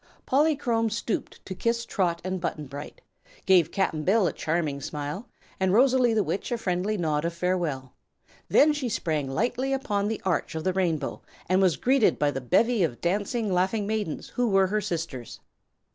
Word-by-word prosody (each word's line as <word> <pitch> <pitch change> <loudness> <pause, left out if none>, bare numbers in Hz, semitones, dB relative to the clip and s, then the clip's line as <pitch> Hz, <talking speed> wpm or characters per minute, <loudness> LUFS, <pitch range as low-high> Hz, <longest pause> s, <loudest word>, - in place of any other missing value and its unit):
Polychrome 265 -6 +2
stooped 225 0 -4
to 190 - -5
kiss 230 +5 -1
Trot 175 -4 -1
and 185 0 -3
Button 155 -3 -3
Bright, 140 +2 -9 0.4
gave 180 -4 +4
Cap'n 160 -5 0
Bill 195 +4 +3
a 160 - 0
charming 155 -3 -2
smile 150 - -5 0.3
and 190 -1 +2
Rosalie 250 0 +4
the 215 - +3
Witch 200 - -3
a 240 - 0
friendly 195 +1 -1
nod 155 -4 0
of 170 0 -2
farewell. 170 -8 -2 0.6
Then 300 +1 +5
she 280 -4 -2
sprang 155 -9 -1
lightly 245 - -1
upon 210 -7 -1
the 220 0 -2
arch 175 -3 -1
of 160 - -3
the 185 - +1
Rainbow 165 -7 -1 0.3
and 185 +2 +3
was 185 -5 +3
greeted 260 -2 +3
by 145 -1 +2
the 135 - -4
bevy 225 - +2
of 140 -9 0
dancing, 205 - -1
laughing 190 +4 +1
maidens 210 -6 -3
who 245 -1 0
were 195 -1 +4
her 210 +3 0
sisters. 165 - -5
190 Hz, 175 wpm, -26 LUFS, 160-225 Hz, 0.6 s, Then